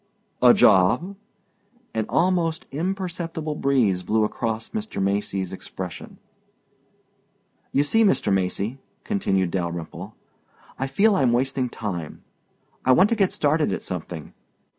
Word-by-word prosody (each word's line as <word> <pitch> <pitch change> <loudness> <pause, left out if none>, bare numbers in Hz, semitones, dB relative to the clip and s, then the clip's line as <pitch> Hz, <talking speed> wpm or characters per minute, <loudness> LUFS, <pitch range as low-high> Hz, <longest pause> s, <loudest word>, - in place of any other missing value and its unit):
"A - - +8
job?" 120 - +4 0.8
An 110 -1 -1
almost 170 -2 +1
imperceptible 170 -1 -3
breeze 125 -11 +1
blew 110 +3 +1
across 115 +1 -2
Mr. 220 - -4
Macy's 95 -1 -1
expression. 95 -1 -8 1.5
"You 140 - +3
see, 225 +10 +3
Mr. 195 - +2
Macy," 100 +6 -1 0.2
continued 95 - 0
Dalyrimple, 85 -3 -4 0.6
"I 135 - -1
feel 200 +10 +3
I'm 130 -8 +3
wasting 130 +1 0
time. 90 -9 -6 0.6
I 130 - +5
want 185 +10 +5
to 230 - +2
get 195 -4 +2
started 150 -3 +1
at - - -3
something. 85 -3 -6
130 Hz, 120 wpm, -24 LUFS, -, 1.5 s, A